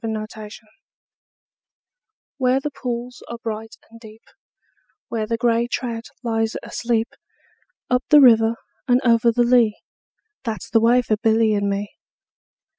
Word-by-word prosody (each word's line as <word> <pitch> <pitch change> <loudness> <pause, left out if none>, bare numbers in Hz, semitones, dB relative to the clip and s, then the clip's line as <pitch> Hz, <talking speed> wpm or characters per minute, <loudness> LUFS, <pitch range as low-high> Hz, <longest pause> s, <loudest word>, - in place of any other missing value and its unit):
A - - -3
Boy's 215 -1 -4 0.2
Song 220 - -18 1.7
WHERE 255 0 +2
the 295 +2 -4
pools 245 -1 -6
are 235 - -6
bright 220 0 -5 0.2
and 230 - -14
deep, 220 -1 -14 0.9
Where 220 -2 -3
the 230 +1 -1
grey 235 0 +1
trout 235 -2 -4 0.2
lies 225 -1 -1
asleep, 235 0 -1 0.8
Up 250 +1 +1
the 300 - +8
river 225 -4 +5 0.3
and 245 0 +4
over 235 0 +4
the 240 +1 +2
lea, 240 -3 +3 0.7
That 225 -4 -4
's - - -13
the 225 - +4
way 240 +2 +4
for 215 -2 0
Billy 220 0 +2
and 200 -1 0
me. 200 +1 -3
230 Hz, 145 wpm, -21 LUFS, 220-245 Hz, 1.7 s, the